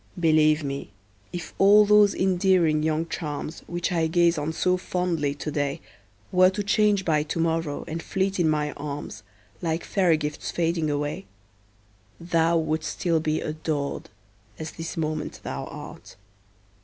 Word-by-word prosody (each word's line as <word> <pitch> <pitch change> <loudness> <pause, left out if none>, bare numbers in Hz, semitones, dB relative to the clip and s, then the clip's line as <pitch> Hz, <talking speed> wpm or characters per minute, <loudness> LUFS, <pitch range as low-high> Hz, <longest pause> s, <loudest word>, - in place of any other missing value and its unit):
Believe 155 -2 +4
me, 140 0 -4 0.4
if 175 -2 -6
all 205 +2 +7
those 210 -1 +5
endearing 180 -4 +2
young 160 +1 0
charms, 155 -1 -5
Which 175 +1 -2
I 165 -2 +1
gaze 170 +1 +3
on 150 0 -2
so 180 +3 +1
fondly 175 -6 -1
today, 145 -1 -2 0.5
Were 185 0 +6
to 205 +2 -3
change 205 -1 +2
by 155 -2 +2
to 150 +3 -4
morrow, 165 -2 -1
and 165 +1 -4
fleet 190 0 -1
in 165 -2 +3
my 150 -1 0
arms, 145 -6 -6 0.4
Like 165 -1 -1
fairy 180 -5 +2
gifts 150 -1 -4
fading 165 -2 0
away, 145 +6 -3 0.9
Thou 170 0 +2
wouldst 155 0 -1
still 170 -2 0
be 155 0 -1
adored, 155 -2 -3 0.5
as 155 0 -6
this 165 0 -7
moment 155 -1 -3
thou - - -4
art. - - -10
160 Hz, 145 wpm, -25 LUFS, 155-180 Hz, 0.9 s, all